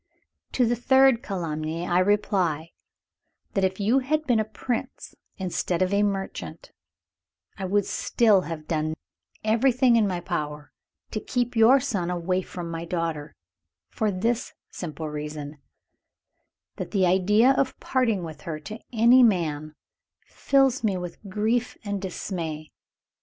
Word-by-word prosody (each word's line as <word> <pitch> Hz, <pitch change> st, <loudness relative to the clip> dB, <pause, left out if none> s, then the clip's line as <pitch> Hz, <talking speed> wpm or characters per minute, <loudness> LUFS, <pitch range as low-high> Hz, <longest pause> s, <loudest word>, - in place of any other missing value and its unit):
"To 250 Hz, -, +3 dB
the 240 Hz, +1 st, +1 dB
third 265 Hz, 0 st, +4 dB
calumny, 165 Hz, -4 st, -3 dB
I 175 Hz, +1 st, +3 dB
reply, 185 Hz, -5 st, +1 dB, 0.8 s
that 195 Hz, -, +1 dB
if 190 Hz, +1 st, 0 dB
you 220 Hz, +7 st, +3 dB
had 305 Hz, +4 st, -1 dB
been 245 Hz, -5 st, +3 dB
a -, -, +2 dB
Prince 230 Hz, +3 st, -5 dB, 0.2 s
instead 185 Hz, -1 st, -1 dB
of 185 Hz, +2 st, -1 dB
a 200 Hz, -, +3 dB
merchant, 195 Hz, -, -3 dB, 0.9 s
I 190 Hz, -, -3 dB
would 200 Hz, +1 st, +1 dB
still 215 Hz, -5 st, +3 dB
have 160 Hz, -3 st, -7 dB
done 155 Hz, -1 st, -1 dB, 0.5 s
everything 240 Hz, +2 st, +3 dB
in 215 Hz, -2 st, +3 dB
my 180 Hz, -2 st, -2 dB
power 150 Hz, -4 st, -4 dB, 0.4 s
to 215 Hz, -, -2 dB
keep 245 Hz, +2 st, -2 dB
your 230 Hz, +5 st, +6 dB
son 210 Hz, -10 st, -2 dB
away 180 Hz, +1 st, 0 dB
from 175 Hz, -2 st, -7 dB
my 165 Hz, 0 st, -4 dB
daughter 165 Hz, -3 st, -3 dB, 0.6 s
for 215 Hz, -, 0 dB
this 225 Hz, +5 st, -1 dB, 0.2 s
simple 155 Hz, -2 st, -6 dB
reason, 150 Hz, 0 st, -6 dB, 1.2 s
that -, -, -5 dB
the 195 Hz, -3 st, +2 dB
idea 205 Hz, +7 st, +4 dB
of 270 Hz, 0 st, 0 dB
parting 230 Hz, -8 st, 0 dB
with 155 Hz, -2 st, -8 dB
her 155 Hz, -2 st, -5 dB
to 215 Hz, +8 st, -8 dB
any 240 Hz, +2 st, +6 dB
man 155 Hz, -9 st, +1 dB, 0.5 s
fills 270 Hz, -3 st, +2 dB
me 200 Hz, -4 st, +1 dB
with 175 Hz, -1 st, -6 dB
grief 225 Hz, +5 st, 0 dB
and 205 Hz, -1 st, -3 dB
dismay. 165 Hz, -5 st, -5 dB
190 Hz, 140 wpm, -25 LUFS, 165-230 Hz, 1.2 s, your